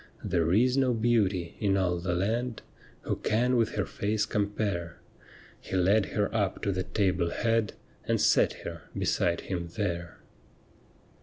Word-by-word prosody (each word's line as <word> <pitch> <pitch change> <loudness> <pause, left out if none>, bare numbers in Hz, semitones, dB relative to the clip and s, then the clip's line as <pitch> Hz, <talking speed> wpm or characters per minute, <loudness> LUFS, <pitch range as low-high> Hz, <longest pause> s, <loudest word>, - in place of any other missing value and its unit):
'There 85 -2 +1
is 125 +6 +4
no 130 -3 +3
beauty 105 -7 +1
in 100 -2 +2
all 90 -2 +1
the 90 0 -1
land 115 +6 -1 0.4
Who - - -2
can 125 +4 +1
with 115 -2 +1
her 100 - 0
face 105 +1 -1
compare.' 100 -5 -2 0.6
He - - -6
led 95 +3 +3
her 105 -1 +1
up 100 -4 -1
to 100 - +1
the 95 -1 -1
table 95 -4 +1
head 115 +1 0 0.3
And - - +1
set - - +3
her - - -7
beside 85 -1 +1
him 85 -3 -4
there. 85 -5 -3
100 Hz, 150 wpm, -28 LUFS, 90-110 Hz, 0.6 s, is